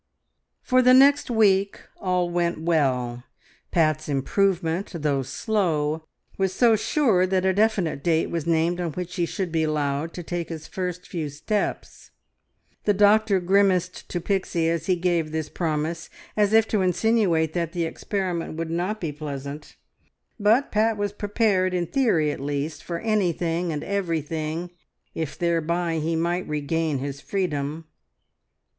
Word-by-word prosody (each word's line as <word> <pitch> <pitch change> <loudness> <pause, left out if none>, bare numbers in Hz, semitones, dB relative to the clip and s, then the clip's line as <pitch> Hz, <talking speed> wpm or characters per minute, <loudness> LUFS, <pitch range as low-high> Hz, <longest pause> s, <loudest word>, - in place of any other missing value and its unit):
For 255 0 +4
the 255 0 +6
next 280 +1 +5
week 200 -4 +3 0.2
all 180 -2 0
went 175 -1 0
well. 130 -7 0 0.5
Pat's 155 -2 +1
improvement, 175 +5 0
though 145 -4 0
slow, 160 - -1 0.3
was 190 -1 +1
so 235 0 +4
sure 215 -5 +2
that 185 0 +1
a 190 - +3
definite 195 -9 +1
date 165 -2 +1
was 170 -2 -3
named 170 +2 +1
on 170 -3 -3
which 180 +1 -5
he 170 -1 +1
should 185 -2 -3
be 160 0 +1
allowed 150 0 -1
to 175 - -6
take 175 0 -4
his 160 -2 -6
first 180 -3 -4
few 160 -4 -4
steps. 155 +9 -3 0.8
The 205 - +3
doctor 205 0 +4
grimaced 185 -1 +1
to 175 - -2
Pixie 175 -3 0
as 170 -1 -2
he 185 - +3
gave 170 -3 0
this 155 -1 -3
promise, 160 0 -2 0.3
as 210 -1 +3
if 225 0 +5
to 210 - +1
insinuate 185 -4 +2
that 170 -2 -2
the 175 -2 -1
experiment 180 -1 -3
would 165 0 -3
not 180 +6 -1
be 165 -6 -3
pleasant, 145 0 -7 0.6
but 220 +7 +3
Pat 220 +1 +2
was 205 -1 -1
prepared 205 -3 +1
in 175 -1 0
theory 170 - +2
at - - -6
least 145 +2 -3
for 170 - -4
anything 175 -5 0
and 150 -1 -3
everything, 165 -3 -2 0.4
if 160 -3 -4
thereby 170 0 0
he 165 +2 -1
might 170 +2 -1
regain 150 0 -1
his 140 +1 -5
freedom. 160 -5 -2
170 Hz, 150 wpm, -24 LUFS, 155-195 Hz, 0.8 s, the